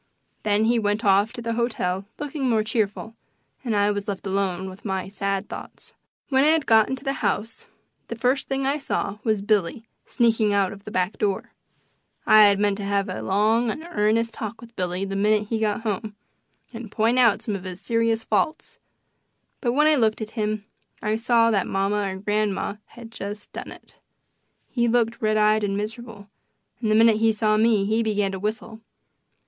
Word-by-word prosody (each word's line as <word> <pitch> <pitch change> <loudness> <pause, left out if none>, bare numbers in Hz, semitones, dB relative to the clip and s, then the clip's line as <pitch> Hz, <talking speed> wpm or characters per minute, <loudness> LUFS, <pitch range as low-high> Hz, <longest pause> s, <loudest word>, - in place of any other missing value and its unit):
Then 210 +1 +2
he 235 +1 +3
went 210 +1 -1
off 200 +2 +4
to 240 -2 -7
the 230 0 -2
hotel 200 -5 -1
looking 290 -2 -3
more 220 -2 +2
cheerful, 220 0 -2 0.5
and 230 -4 -1
I 205 0 +3
was 205 0 -4
left 200 -1 -4
alone 190 -1 -1
with 190 +2 -11
my 190 -3 -3
sad 195 0 -2
thoughts. - - -9 0.4
When 265 -1 +3
I 315 +2 +5
got 225 -8 +3
into 265 0 -4
the 275 -1 -1
house 215 +2 -2 0.4
the 230 - -5
first 250 +4 0
thing 270 0 -1
I 280 +2 0
saw 210 -7 -3
was 215 -4 0
Billy 210 +1 0 0.2
sneaking 225 -3 +2
out 195 -2 +1
of 200 0 -14
the - - -6
back 185 -1 -1
door. 200 -2 -1 0.7
I 215 - +7
had 200 -1 +4
meant 205 -1 +1
to 205 - -5
have 200 0 0
a 185 - -4
long 220 +4 +2
and 310 +9 -5
earnest 230 -3 +1
talk 220 +1 -6
with 235 0 -14
Billy 180 0 -2
the 195 0 -4
minute 210 +1 +1
he 225 - -1
got 215 -1 0
home, 215 -1 -3 0.6
and 225 -2 -8
point 230 +4 +2
out 230 -5 +4
some 210 - -2
of 190 - -6
his 185 -1 -7
serious 230 +2 0
faults, 315 0 -1 0.8
but 240 -3 0
when 300 +3 +3
I 310 - +5
looked 225 -6 +2
at 220 -1 -6
him 215 -2 -2 0.4
I 215 0 +1
saw 230 0 +3
that 200 -4 +1
mamma 200 +1 0
or - - -5
grandma 205 0 -1
had 235 -1 -12
just 205 -1 -7
done - - -7
it. - - -15 0.7
He 235 -2 0
looked 235 0 +1
red 215 -1 +2
eyed 215 0 +3
and 200 -1 -1
miserable, 215 -1 -6 0.5
and 220 - 0
the 215 - +3
minute 225 -1 +5
he 225 0 +3
saw 215 0 +1
me 215 -2 +3
he 220 +3 +1
began 205 -3 0
to 190 - -5
whistle. 220 +2 -4
215 Hz, 195 wpm, -24 LUFS, 200-230 Hz, 0.8 s, I